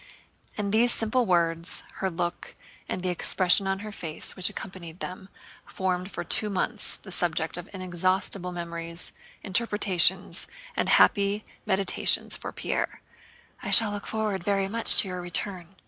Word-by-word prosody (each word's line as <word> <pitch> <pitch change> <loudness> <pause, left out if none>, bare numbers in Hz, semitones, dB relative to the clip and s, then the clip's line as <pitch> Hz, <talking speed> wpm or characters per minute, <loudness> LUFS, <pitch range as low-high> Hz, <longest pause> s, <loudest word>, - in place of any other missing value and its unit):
And 200 -1 -2
these 235 +2 +4
simple 230 +2 0
words, 170 -1 0
her 190 - -1
look, 175 0 -4 0.3
and 185 - -3
the 185 - 0
expression 185 +2 +2
on 195 0 -1
her 215 - -6
face 165 -5 -5
which 185 -1 +3
accompanied 180 -3 -9
them, 190 +1 -7 0.3
formed 185 0 -3
for - - -5
two 210 - +1
months 205 +3 -1
the 190 - -13
subject 165 -2 0
of 175 +2 -7
inexhaustible 185 0 0
memories, 170 -1 -6 0.3
interpretations, 195 -3 +2 0.3
and - - 0
happy 200 +1 +4 0.2
meditations 195 -1 +3
for - - -7
Pierre. - - -3 0.6
"'I - - -5
shall 220 -2 +7
look 205 0 -6
forward 215 -4 -2
very 195 0 +1
much 230 +3 +4
to - - +6
your 180 -1 -5
return.... 175 0 -4
190 Hz, 145 wpm, -27 LUFS, 175-205 Hz, 0.6 s, shall